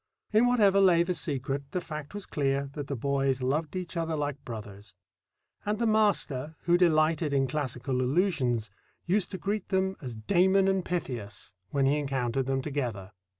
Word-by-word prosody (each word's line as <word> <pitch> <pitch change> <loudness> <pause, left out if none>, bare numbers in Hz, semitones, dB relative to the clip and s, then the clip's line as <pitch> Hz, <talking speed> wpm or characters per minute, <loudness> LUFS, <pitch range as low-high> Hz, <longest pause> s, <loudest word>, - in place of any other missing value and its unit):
In 225 +3 +5
whatever 205 -5 +4
lay 175 -3 +5
the 180 +1 -1
secret, 140 -3 -3
the 180 - +1
fact 150 0 -7
was 205 - -4
clear 140 -1 -1
that 145 -1 -5
the 140 - -2
boys 135 0 0
loved 150 +6 -1
each 180 -1 -4
other 165 -1 -1
like 145 -2 -3
brothers; 105 -3 -9 0.7
and 210 +1 -1
the 235 - 0
master, 200 - +1
who 175 0 +3
delighted 160 -3 +3
in 135 -1 +3
classical 130 -2 -2
allusions, 130 - +1 0.3
used 185 +1 +1
to 190 - -5
greet 200 +3 -2
them 190 0 +1
as 125 -5 -6
Damon 190 - +3
and 190 -1 +2
Pythias 125 - -4 0.2
when 140 -1 +1
he 140 +2 +3
encountered 135 -2 -1
them 135 -1 0
together. 120 -10 -3
145 Hz, 170 wpm, -29 LUFS, 130-180 Hz, 0.7 s, In